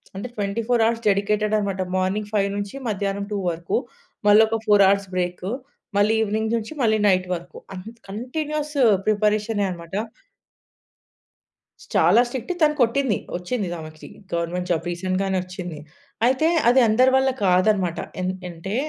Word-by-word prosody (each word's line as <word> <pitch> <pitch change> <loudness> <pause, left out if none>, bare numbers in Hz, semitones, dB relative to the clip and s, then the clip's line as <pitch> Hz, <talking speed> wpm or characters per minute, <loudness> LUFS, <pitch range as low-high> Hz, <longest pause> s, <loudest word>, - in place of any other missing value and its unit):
అంటే 200 +5 -5
24 225 +4 0
hours 230 0 0
dedicated 210 +2 +1
అన్నమాట. 195 -2 -2 0.2
Morning 200 +3 -1
5 200 -2 +2
నుంచి 205 +4 -5
మధ్యాహ్నం 200 0 -2
2 205 - -1
వరకు. 170 0 -2 0.5
మళ్ళొక 220 +2 +5
4 205 -1 +6
అవర్స్ 200 -1 +1
బ్రేక్, 180 0 -2 0.5
మళ్ళీ 205 +2 +4
ఈవెనింగ్ 220 +1 -1
నుంచి 225 +7 -6
మళ్ళీ 220 -2 +3
నైట్ 185 -1 +2
వరకు 175 -1 -10 0.2
అం 185 - -6 0.3
కంటిన్యూయస్ 300 +7 -4 0.3
ప్రిపరేషనే 210 0 +1
అన్నమాట. 170 0 -7 1.9
స్ - - -15
చాలా 180 +9 +5
స్ట్రిక్ట్. 245 +5 -5
తను 300 -1 +4
కొట్టింది. 245 -2 +2 0.2
వచ్చింది. 195 +2 -3
ఆమెకి 155 0 -10 0.3
గవర్నమెంట్ 170 +1 -2
జాబ్ 165 -1 0
రీసెంట్‌గానే 185 +2 -1
వచ్చింది. 180 -4 -7 0.5
అయితే 260 +6 +3 0.2
అది 255 +2 +5
అందరి 255 +4 +4
వల్ల 265 0 +3 0.2
కాదన్నమాట. 185 -1 +2 0.2
ఎన్ 185 0 0 0.2
అంటే 175 +4 -6
205 Hz, 135 wpm, -23 LUFS, 185-225 Hz, 1.9 s, 4